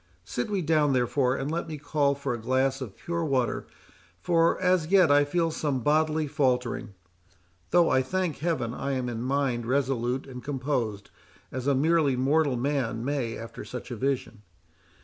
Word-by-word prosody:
Sit 125 - -3
we 200 -3 -1
down, 150 -3 +3
therefore, 125 +1 +1
and 140 +2 -3
let 170 +1 -2
me 155 -1 -5
call 145 -1 +1
for 140 -2 -3
a 120 - -5
glass 130 +3 +1
of 115 -7 -7
pure 170 0 -3
water, 130 -5 0 0.5
for 165 - +2
as 180 -3 +2
yet 180 -4 +5
I 145 0 +6
feel 165 +3 0
some 145 -5 -1
bodily 155 +3 +2
faltering; 125 -6 -1 0.7
though, 175 -1 +4
I 130 - +4
thank 180 +3 -2
Heaven, 155 -7 -1
I 140 +2 -3
am 130 -2 -2
in 115 -2 -4
mind 130 -3 0
resolute 130 -1 0
and 125 -2 -9
composed 125 -7 -2 0.4
as 130 +1 -4
a 140 - +3
merely 150 -1 +3
mortal 140 +1 +2
man 125 -3 -1
may 135 -5 -2
after 115 0 -8
such 120 +4 -8
a - - -3
vision. 125 -3 -2
135 Hz, 170 wpm, -27 LUFS, 125-155 Hz, 0.7 s, I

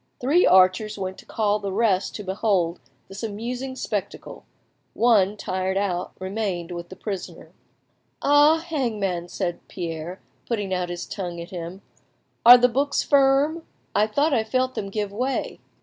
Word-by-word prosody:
Three 295 +8 +3
archers 185 +3 +4
went 190 -1 -5
to - - -15
call 210 -1 0
the 200 -1 -4
rest 200 -2 +1
to 210 - -5
behold 190 -3 0 0.3
this 195 +1 -9
amusing 240 +4 -4
spectacle; - - -5 0.5
one, 210 -4 +3
tired 190 0 -2
out, 185 -3 -2
remained 185 -3 -3
with 170 0 -6
the 185 - -9
prisoner. 195 -3 -7 0.7
"Ah, 290 +2 +5
Hangman," 220 - -2
said 175 -1 -3
Pierre, 170 0 -5 0.3
putting 205 -5 -2
out 180 -1 -1
his 175 0 -5
tongue 175 -3 -5
at 170 - -8
him, 175 +1 -7 0.6
"are 245 +2 +11
the 245 0 +4
books 280 +3 0
firm? 280 +4 +3 0.3
I 210 +1 +3
thought 285 +7 +1
I 225 - +2
felt 255 +3 0
them 200 -5 -4
give 205 0 -3
way." 255 +6 -2
205 Hz, 150 wpm, -24 LUFS, 185-245 Hz, 0.7 s, are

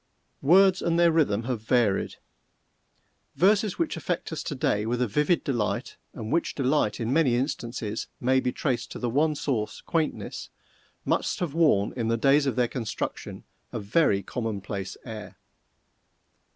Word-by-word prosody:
Words 185 +5 +5
and 170 0 +1
their 170 -1 +5
rhythm 125 -10 +2
have 120 -2 -3
varied. 110 -3 +1 1.2
Verses 205 +2 +3
which 335 - -1
affect 175 -2 -3
us 160 - -3
to 145 - -4
day 105 -5 +1
with 120 +1 -1
a 125 - +1
vivid 150 - +1
delight, 115 -3 -2 0.2
and 110 -1 -6
which 170 - 0
delight, 135 -5 +1
in 115 +2 -1
many 140 -6 +3
instances, 120 -4 -3
may 130 +2 +3
be 125 -1 -1
traced 130 -1 -2
to - - -6
the 120 -2 -2
one 150 +4 +2
source, 120 -7 -2
quaintness, 160 -2 -2 0.6
must - - 0
have 170 -6 -2
worn 150 -12 +3
in 115 -3 -2
the 115 0 +1
days 140 +4 +4
of 135 - 0
their 125 -1 +2
construction, 115 -3 -5 0.3
a - - -3
very 100 -2 +2
commonplace 100 -4 -4
air. 110 -3 -8
125 Hz, 155 wpm, -26 LUFS, 110-155 Hz, 1.2 s, Words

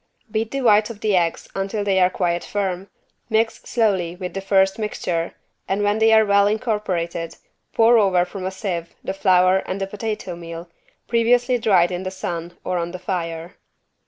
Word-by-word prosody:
Beat 220 0 -1
the 275 +2 -3
whites 215 -2 +4
of 220 -3 -9
the 210 -2 +2
eggs 170 -2 0
until 195 +2 -2
they 195 -2 +2
are 180 0 +5
quite 175 -2 -1
firm, 195 -2 -3 0.4
mix 225 0 +1
slowly 190 -7 0
with 180 -1 -6
the 195 - -4
first 195 +1 +2
mixture 175 -5 -2 0.3
and 200 +2 0
when 205 +1 +1
they 225 0 +5
are 220 0 +6
well 200 0 +4
incorporated 190 -7 -2 0.4
pour 230 +1 +5
over 185 -4 +3
from 185 +1 -8
a 185 - -1
sieve 185 -3 -5
the 190 - -3
flour 185 -1 +4
and 190 - -3
the 195 - -1
potato 210 -2 -5
meal, 170 0 -8 0.4
previously 245 +2 +2
dried 185 -6 +3
in 180 0 -3
the 185 - -3
sun 175 -2 -5
or 180 -1 -1
on 170 +1 -4
the - - -4
fire. 170 -2 -4
195 Hz, 185 wpm, -22 LUFS, 180-215 Hz, 0.4 s, are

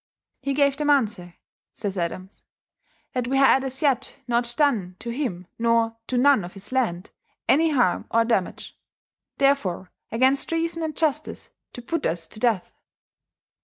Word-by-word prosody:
He 275 0 -1
gave 280 -1 +3
them 295 -1 0
answer, 210 -11 +1 0.4
says 205 -3 -3
Adams, 185 +2 -5 0.7
"that 250 -2 -1
we 270 +2 +1
had 270 -1 +5
as 265 +2 -4
yet 275 -3 +1
not 240 0 +1
doen 220 -12 +1
to 235 +3 -6
him 235 -9 -3
nor 230 -1 +2
to 255 - -1
none 270 -4 +5
of 175 - -8
his 195 +4 -8
lande 215 -9 -1 0.4
any 320 +4 +4
harme 270 -5 +2
or 230 0 +3
dammage: 225 -6 -1 0.6
therefore 275 -11 +1 0.2
against 260 +6 +2
Reason 330 0 -1
and 315 -2 -3
Iustice 310 -3 -1 0.2
to 245 - -9
put 330 +5 -2
vs 165 -7 -2
to - - -11
death." 220 -6 0
245 Hz, 155 wpm, -24 LUFS, 205-280 Hz, 0.7 s, had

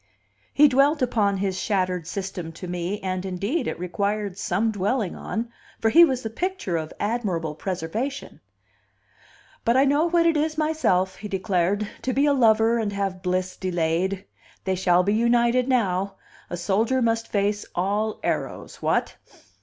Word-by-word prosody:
He 295 +1 +6
dwelt 275 +2 +3
upon 205 -5 +1
his 190 -1 -1
shattered 185 -5 -1
system 190 -4 -5
to 180 - -8
me, 180 +3 -3
and, 185 -1 -2
indeed, 200 - -2
it - - -3
required 200 +2 -2
some 220 +3 0
dwelling 205 0 -1
on, 230 +1 -4 0.3
for 225 - +2
he 335 +9 +8
was 260 -6 +2
the 220 - -3
picture 360 - -2
of 155 -1 -3
admirable 195 -8 -1
preservation. 190 - -4 1.2
"But 235 +2 +3
I 270 - +5
know 290 +3 +3
what 340 0 +3
it 330 -1 +4
is 310 +1 0
myself," 190 -13 +1
he 210 - -7
declared, 195 +1 0
"to 255 +2 -1
be 275 +3 +3
a 290 - +4
lover 225 -2 +4
and 215 -2 -1
have 195 -2 -3
bliss 185 0 -1
delayed. 180 +2 -1 0.4
They 190 - 0
shall 180 -1 +3
be 200 +2 +1
united 235 +2 +3
now. 200 -6 +1 0.3
A 175 - -4
soldier 215 +8 +1
must 230 0 0
face 205 0 0
all 205 +4 -1
arrows. - - -3
What!" - - 0
205 Hz, 160 wpm, -24 LUFS, 185-240 Hz, 1.2 s, he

